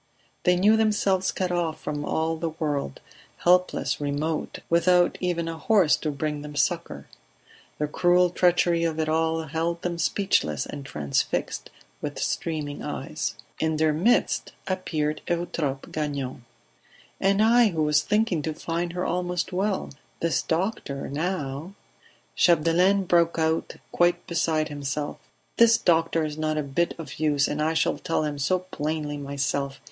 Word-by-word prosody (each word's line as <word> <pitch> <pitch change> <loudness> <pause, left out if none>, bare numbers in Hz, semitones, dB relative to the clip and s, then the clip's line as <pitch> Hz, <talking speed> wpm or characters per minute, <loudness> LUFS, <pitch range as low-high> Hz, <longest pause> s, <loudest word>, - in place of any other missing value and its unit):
They 180 -1 +5
knew 210 +5 +4
themselves 205 -4 +2
cut 185 -1 -2
off 170 -3 -1
from 145 -1 -4
all 160 +2 0
the 165 +1 -2
world, 145 - -3 0.4
helpless, 180 -3 +2
remote, 145 +2 -2
without 175 +1 +4
even 175 -2 -1
a 165 -1 -5
horse 185 -9 +4
to 155 - -3
bring 150 0 -3
them 150 0 -8
succour. 145 - -1 0.7
The 150 - 0
cruel 175 +3 +3
treachery 175 -1 +3
of 160 -1 -1
it 160 - 0
all 160 +1 +1
held 165 +2 -2
them 175 -1 -2
speechless 160 - +1
and 145 -1 -7
transfixed, 75 - -2 0.3
with - - -4
streaming 150 -3 -2
eyes. - - -4 0.2
In 160 0 +1
their 155 0 +3
midst 195 +11 +1
appeared 155 -5 -2
Eutrope 165 -5 -2
Gagnon. 140 -5 -3 0.7
"And 195 +1 +2
I 230 +2 +6
who 165 -6 0
was 150 0 +3
thinking 210 -5 +1
to 155 +1 -3
find 170 +2 -3
her 180 +1 -2
almost 180 +1 -2
well. 195 +1 -1 0.3
This 165 -1 +1
doctor, 160 -5 -2
now 155 +2 -3 0.3
..." - - -32
Chapdelaine 175 +4 +4
broke 170 -2 +2
out, 160 0 0 0.2
quite 175 0 +2
beside 160 -3 0
himself: 145 0 -4 0.4
"This 230 0 +6
doctor 165 -3 +2
is 150 0 -5
not 155 0 0
a 150 - 0
bit 140 +5 -1
of 150 -5 -8
use, 145 -2 +2
and 150 - -2
I 160 +1 +1
shall - - +1
tell 165 - -1
him 145 -1 -3
so 165 +7 +2
plainly, 155 -4 -3
myself. 140 0 -2
160 Hz, 150 wpm, -25 LUFS, 150-180 Hz, 0.7 s, I